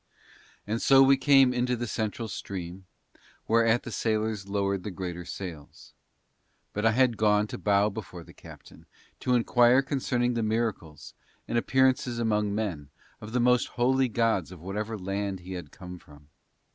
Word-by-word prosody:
And 110 +3 -2
so 135 0 +6
we 135 +1 +6
came 135 -1 +4
into 125 0 0
the 120 0 -4
central 110 0 -3
stream, 95 -2 -7 0.6
whereat 115 +1 +3
the 120 - -7
sailors 110 -3 -1
lowered 100 -1 -1
the 105 - -5
greater 90 -2 -6
sails. 80 -7 -9 0.8
But 105 +2 +1
I - - +4
had 125 -2 +2
gone 105 -1 +3
to - - -6
bow 100 0 +2
before 95 -5 -8
the - - -16
captain, - - -14
and - - -20 0.3
to 125 - +1
inquire 120 +2 +4
concerning 125 -3 -1
the 115 - -1
miracles, 110 -8 -3 0.3
and - - -3
appearances 130 0 +2
among 105 -3 0
men, 90 -10 -3 0.3
of 110 0 -9
the 125 - 0
most 125 0 +3
holy 130 +1 +2
gods 110 -7 0
of 90 - -11
whatever 105 +5 -4
land 100 0 -4
he 95 +2 -8
had 90 -5 -7
come 90 +1 -10
from. 75 -2 -19
110 Hz, 165 wpm, -27 LUFS, 95-120 Hz, 0.8 s, so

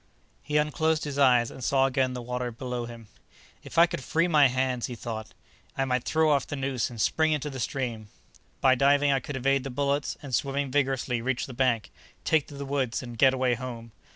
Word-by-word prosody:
He 150 0 -1
unclosed 155 +1 +1
his 145 -1 -4
eyes 125 -4 +4
and 130 - -9
saw 135 +1 +3
again 130 -1 +1
the 125 - -5
water 125 0 -3
below 120 0 -5
him. 115 -2 -11 0.6
"If - - -10
I 170 - +8
could 150 -6 -5
free 165 +6 +1
my 150 -5 +5
hands," 130 -1 -1
he 125 - -6
thought, 110 -1 -7 0.4
"I 135 - +1
might 125 -2 -1
throw 160 -1 +2
off 140 -4 +1
the - - -4
noose 135 -3 -1
and 120 -2 -10
spring 160 +7 +2
into 150 0 -2
the 130 - -6
stream. 120 -3 -3 0.5
By 130 -1 +5
diving 140 +2 +3
I 135 - +2
could 140 +2 -7
evade 135 +1 +1
the 135 - -5
bullets 140 +2 -1
and, 135 -3 -8
swimming 140 +1 -1
vigorously, 130 -3 0
reach 130 +1 -1
the 130 - -9
bank, 120 -3 0 0.3
take 155 -3 +2
to 145 - -11
the 140 0 -6
woods 135 -3 -1
and 120 -1 -8
get 130 +3 +4
away 130 -1 +1
home. 120 -2 -6
130 Hz, 215 wpm, -27 LUFS, 125-140 Hz, 0.6 s, I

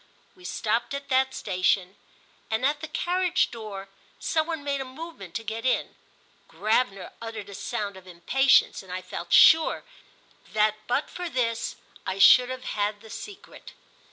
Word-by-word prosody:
We 365 -1 -16
stopped 230 +1 -1
at 280 0 -7
that 265 0 +3
station, 185 -1 0 0.5
and, 220 +3 0
at 290 +1 +1
the 315 - -4
carriage 360 +3 +1
door, 210 -4 -7 0.3
some 315 -1 0
one 320 -3 -4
made 280 -1 -1
a - - -2
movement 260 - -10
to 225 - -3
get 225 +1 -5
in. 255 - 0 0.5
Gravener 210 -3 0
uttered 225 -3 -7
a - - -9
sound 205 -1 -4
of 190 -1 -14
impatience, 245 +11 +3
and 190 -2 -13
I 185 0 -4
felt 170 -1 -7
sure 320 0 +6 0.7
that 215 0 +3
but 260 +4 0
for 355 -1 -5
this 230 -5 -1 0.3
I 190 - -2
should 250 +5 +7
have 255 0 -5
had 205 -2 -2
the 220 -1 -13
secret. 410 -2 -10
230 Hz, 160 wpm, -26 LUFS, 200-280 Hz, 0.7 s, should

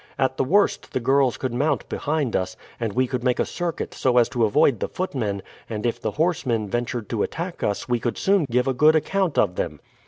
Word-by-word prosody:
At 130 -1 +1
the - - +2
worst 200 +9 +1
the - - +1
girls 135 0 +2
could 130 -3 -3
mount 145 +5 0
behind 150 -5 -1
us, 95 0 -2 0.2
and 115 -3 -1
we 130 +2 +2
could 125 -1 -3
make 125 -1 +1
a - - +2
circuit 175 -2 -4
so 125 -1 +1
as 120 -1 +5
to 120 -3 +2
avoid 110 +2 +3
the - - -1
footmen, 110 - -3 0.3
and 110 -1 -4
if 120 - -1
the - - -1
horsemen 130 -10 0
ventured 120 +1 -2
to 115 -3 -1
attack 175 +1 -3
us 100 +2 -1
we 120 -1 +1
could 120 0 -2
soon 195 -4 +2
give 125 +2 +1
a 135 - +2
good 150 +5 +5
account 185 +1 0
of 90 -4 +2
them." - - -3
125 Hz, 225 wpm, -23 LUFS, 115-150 Hz, 0.3 s, as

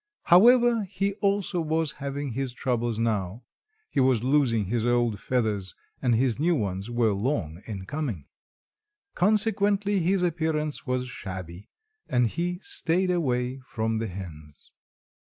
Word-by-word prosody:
However, 235 +4 +6
he 195 +1 -2
also 200 -3 +1
was 160 -1 0
having 140 0 -3
his 130 +1 -3
troubles 120 -3 -1
now. 110 -1 -1 0.5
He - - 0
was 130 -4 +3
losing 130 -6 +2
his 110 +3 -1
old 120 -3 +1
feathers, 105 -7 -1 0.3
and 125 -3 +2
his 125 +1 +1
new 170 +3 +2
ones 100 -3 -3
were 120 -3 +2
long 100 - -2
in 100 -4 -6
coming. 125 - -4 0.9
Consequently, 205 0 +2
his 180 +2 +1
appearance 160 -4 -1
was 125 0 -1
shabby, 95 -5 -8 0.4
and 125 -1 +3
he 175 +8 -2
staid 180 +2 +1
away 130 -6 0
from 110 0 -1
the 115 - -2
hens. 80 -6 -10
125 Hz, 135 wpm, -26 LUFS, 110-170 Hz, 0.9 s, However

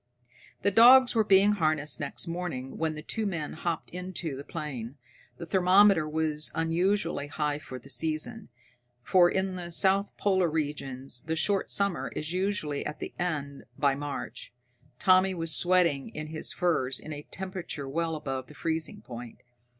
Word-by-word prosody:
The 200 - +3
dogs 245 +4 +8
were 225 -2 +3
being 200 0 +5
harnessed 155 -8 +1
next - - -3
morning 165 -7 -4
when 160 -1 0
the 150 - -8
two 220 +5 -2
men 165 -6 -3
hopped 165 0 -3
into 180 -4 -4
the 140 - -7
plane. 140 -6 -6 0.4
The 170 - -7
thermometer 185 -1 +5
was 155 -1 -1
unusually 165 -1 0
high 150 0 -2
for 130 -4 -8
the 135 +3 -13
season, 155 - -3 0.5
for 175 +4 +5
in 190 0 -1
the 175 -1 -6
south 195 +3 +2
polar 190 -4 +2
regions 140 -5 -3
the 160 - 0
short 195 +4 +1
summer 200 -3 +1
is 155 +3 -3
usually 185 -6 -1
at 150 - -6
an - - -5
end 145 -6 -3
by 140 -2 +3
March. 145 +1 -6 0.5
Tommy 185 +3 +4
was 165 -2 -1
sweating 175 -6 +2
in 155 0 -6
his 155 0 -3
furs 135 -8 +1
in 155 - -7
a 145 0 -8
temperature 185 -7 -5
well 165 +3 -1
above 135 -4 -4
the 150 - -14
freezing 165 +6 -3
point. 120 -2 -9
160 Hz, 160 wpm, -28 LUFS, 145-185 Hz, 0.5 s, dogs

